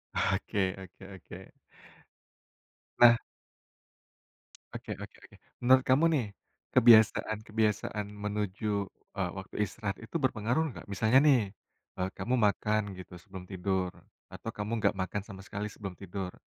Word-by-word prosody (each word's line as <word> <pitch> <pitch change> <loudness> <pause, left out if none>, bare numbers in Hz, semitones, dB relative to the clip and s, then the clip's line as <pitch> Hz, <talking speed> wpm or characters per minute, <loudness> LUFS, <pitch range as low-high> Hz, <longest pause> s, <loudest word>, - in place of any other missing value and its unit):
Oke 100 +1 +1 0.2
oke 95 +1 -15
oke. 95 - -12 1.5
Nah 120 -1 +9 1.6
Oke - - -5
oke - - -11
oke. - - -18 0.3
Menurut 130 +1 +6
kamu 130 +5 +3
nih, 130 -6 +1 0.5
kebiasaan-kebiasaan 110 -3 +3
menuju, 105 0 -2 0.3
eee, 90 -2 0
waktu 95 - -9
istirahat 100 -1 -4
itu 110 - -12
berpengaruh 125 +3 +1
nggak, - - -10
misalnya 110 +5 +4
nih, 135 -4 +6 0.6
eee, 90 +1 0
kamu 115 +7 0
makan 105 -1 +1
gitu 90 -1 -10
sebelum 95 0 -10
tidur 95 -1 -1 0.4
atau - - -7
kamu 105 +1 -4
nggak 105 - +2
makan 95 +2 -2
sama 95 -2 -10
sekali 105 +1 -4
sebelum 100 -3 -8
tidur, 95 -1 -5
105 Hz, 125 wpm, -30 LUFS, 95-110 Hz, 1.6 s, Nah